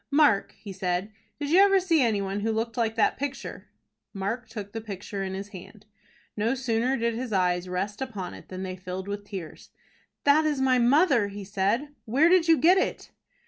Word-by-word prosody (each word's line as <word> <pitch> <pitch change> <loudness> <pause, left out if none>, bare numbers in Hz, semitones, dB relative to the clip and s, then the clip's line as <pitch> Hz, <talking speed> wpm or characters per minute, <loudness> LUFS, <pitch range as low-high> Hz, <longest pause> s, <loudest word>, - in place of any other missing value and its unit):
"Mark," 285 -9 +3
he 200 -3 -9
said, 185 +1 -2 0.3
"did 290 0 -3
you 355 - +6
ever 395 -1 +6
see 340 -5 +2
any 220 -5 +1
one 195 +1 -3
who 220 +2 -1
looked 225 +1 -2
like 225 -2 0
that 225 - +2
picture?" 275 0 -5 0.5
Mark 225 +5 -3
took 205 -3 -7
the 225 - -5
picture 200 -1 -6
in 190 0 -4
his 195 +1 -6
hand. 205 +2 -12 0.5
No 225 +5 0
sooner 250 0 0
did 235 0 0
his 240 +1 -4
eyes 180 -2 +1
rest 195 +5 -3
upon 210 -9 -5
it - - -13
than 185 0 -6
they 185 -1 -4
filled 185 +1 -6
with 205 0 -5
tears. 190 -6 -8 0.5
"That 290 +2 +5
is 300 -3 0
my 260 -1 +3
mother" 265 - +4
he 200 0 -7
said. 205 +8 0 0.2
"Where 275 +9 +4
did 355 -2 +4
you 325 -1 +6
get 360 +5 +5
it?" - - -3
220 Hz, 200 wpm, -26 LUFS, 195-265 Hz, 0.5 s, you